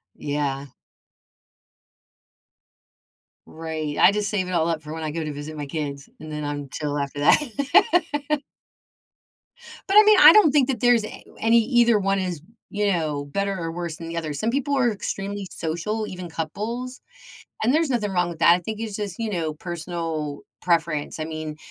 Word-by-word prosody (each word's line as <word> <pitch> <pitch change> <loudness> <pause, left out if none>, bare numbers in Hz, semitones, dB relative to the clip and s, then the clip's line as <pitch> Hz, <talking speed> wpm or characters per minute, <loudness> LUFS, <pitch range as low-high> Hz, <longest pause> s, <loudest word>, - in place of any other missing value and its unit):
Yeah. 145 -1 -3 2.8
Right. 160 -2 -5
I - - +7
just 210 0 -1
save 190 -4 -1
it - - -5
all 165 -2 +1
up 160 -2 -2
for 150 +1 -7
when 160 0 -5
I 155 - -2
go 165 +1 -3
to 150 -1 -4
visit 145 +2 -7
my 145 - -4
kids, 140 -1 -5
and 155 0 -9
then 150 0 -4
I'm 145 -1 -4
chill 145 +1 -3
after 140 0 -3
that. 290 - +2 1.5
But, 395 - +4
I 425 - +10
mean, 425 -1 +7
I - - +10
don't 415 -9 +6
think 280 -3 +3
that 255 -4 -1
there's 245 -1 +4
a - - -10 0.2
any 230 +1 +4
either 235 -2 +3
one 195 0 +1
is, 180 -5 -3 0.3
you 205 0 -1
know, 155 -5 -1
better 200 +6 -2
or 165 -2 -4
worse 170 -1 -5
than 165 - -8
the 170 - -5
other. 155 -3 -3
Some 185 +11 -1
people 280 +2 0
are 240 -3 +3
extremely 200 -1 -4
social, 195 +7 -3
even 180 -2 -7
couples, 225 +11 -5 0.6
and 240 +5 +3
there's 320 -2 +2
nothing 220 -5 0
wrong 175 -1 +1
with 170 -2 -7
that. 170 - +7
I - - +1
think 215 +4 -6
it's 220 -3 -4
just, 205 -4 -5
you 225 -1 -2
know, 165 -5 -2
personal 165 -3 -4 0.2
preference. 165 -4 0
I 155 - -2
mean, 155 -1 -6
175 Hz, 180 wpm, -24 LUFS, 155-220 Hz, 2.8 s, I